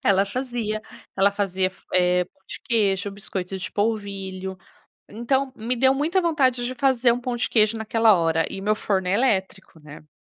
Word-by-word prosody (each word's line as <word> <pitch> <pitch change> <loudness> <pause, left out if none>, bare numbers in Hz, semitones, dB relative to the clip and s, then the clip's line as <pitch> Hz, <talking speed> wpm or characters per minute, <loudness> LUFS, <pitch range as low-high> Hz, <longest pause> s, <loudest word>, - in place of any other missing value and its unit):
ela 195 -4 +4
fazia, 235 -2 -3 0.3
ela 200 +1 +4
fazia 190 -2 0
f - - -23
eh, 180 0 +3
pão 190 +2 -32
de - - -8
queijo, 200 -3 +1
biscoito 195 -2 -5
de 185 - -6
polvilho. 195 -3 -3 0.5
Então, 265 +5 -1
me 230 +3 -2
deu 260 +2 +3
muita 320 +7 +1
vontade, 265 -8 +1
de 255 +1 -3
fazer 255 -2 +3
um 245 - -3
pão 245 0 -3
de 240 - -1
queijo 215 0 +3
naquela 220 0 +3
hora, 165 -2 +1
e - - -5
meu 210 +2 +1
forno 190 -3 -1
é 185 - +2
elétrico, 190 -7 -1
né? 150 0 -13
210 Hz, 180 wpm, -23 LUFS, 190-245 Hz, 0.5 s, ela